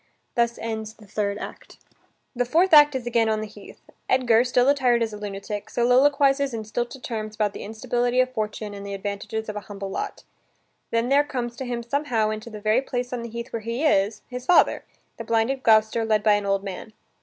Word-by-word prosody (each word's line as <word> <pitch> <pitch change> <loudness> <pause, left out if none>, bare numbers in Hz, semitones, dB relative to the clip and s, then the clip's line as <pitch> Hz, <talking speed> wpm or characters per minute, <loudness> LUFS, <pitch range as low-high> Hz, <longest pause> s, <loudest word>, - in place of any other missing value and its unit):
Thus 235 -1 +1
ends 220 -1 -5
the 215 - -17
third 200 0 -2
act. - - -9 0.6
The 245 - +1
fourth 330 +8 +2
act 295 -2 +8
is 255 -2 -3
again 230 -2 +2
on 215 0 +1
the 215 - -3
heath. 210 -1 -13 0.3
Edgar, 240 -3 +4
still 250 0 +2
attired 255 -4 +3
as 220 -1 -3
a - - -6
lunatic, 205 0 -5
soliloquizes 275 +2 +3
in 220 - -4
stilted 240 +4 -4
terms 215 -2 -4
about 210 -2 0
the - - -8
instability 245 +3 -1
of 255 0 +2
fortune 215 -2 -3
and 200 0 -8
the 200 0 -5
advantages 205 +2 -4
of 210 - -5
a - - -2
humble 195 -1 -6
lot. 415 - -5 0.7
Then 230 +1 0
there 280 +1 +5
comes 245 -4 -4
to 265 - -4
him 240 -1 -3
somehow 235 -4 0
into 215 +2 -6
the 215 -2 -8
very 215 +4 +2
place 250 -2 -4
on 245 - -3
the 235 - -6
heath 235 +1 -7
where 230 - -1
he 230 +7 -2
is, 205 -6 +2
his 250 0 -7
father, 360 - +4 0.3
the - - -5
blinded 230 +4 0
Gloucester, 220 -1 +4
led 215 -1 +1
by 215 - +5
an 205 -1 0
old 195 0 +1
man. 200 +2 -7
230 Hz, 210 wpm, -24 LUFS, 215-250 Hz, 0.7 s, act